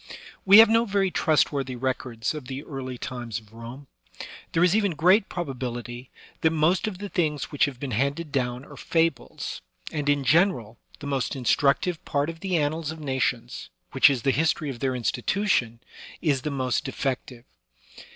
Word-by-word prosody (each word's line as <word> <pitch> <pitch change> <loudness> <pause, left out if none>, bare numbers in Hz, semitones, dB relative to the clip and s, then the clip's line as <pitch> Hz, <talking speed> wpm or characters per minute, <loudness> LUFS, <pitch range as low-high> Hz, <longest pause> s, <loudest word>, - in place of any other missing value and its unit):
We 195 +1 +9
have 225 +1 +10
no 225 +2 +3
very 195 -3 +1
trustworthy 140 -6 +1
records 125 -2 -2
of 150 -5 -7
the 135 +2 -5
early 130 -4 -6
times 120 -3 -5
of 110 -1 -12
Rome; 120 +5 -9 0.7
there 165 - +2
is 180 +2 +4
even 205 -5 +2
great 185 +7 +4
probability 125 -5 -5 0.3
that 160 - +4
most 165 +6 +2
of 200 -4 -4
the 205 +2 -6
things 155 -7 -1
which 145 - +3
have 135 -4 -6
been 140 -1 -4
handed 140 +7 -1
down 125 -1 -2
are - - -12
fables, 165 -6 -1 0.3
and 150 -2 -2
in 145 -1 +2
general, 130 - +2 0.2
the - - -7
most 140 -1 -1
instructive 140 +6 +1
part 145 +3 -1
of 165 - -14
the 185 -2 0
annals 155 +1 -1
of 160 0 -6
nations, 130 -4 -2 0.2
which 135 +2 +6
is 130 -5 -1
the 135 - +3
history 155 +1 0
of 120 - -9
their 130 0 -1
institution, 120 - 0 0.4
is 145 -5 +1
the 150 - -3
most 130 -3 -1
defective. 130 -2 -4
140 Hz, 170 wpm, -25 LUFS, 125-165 Hz, 0.7 s, have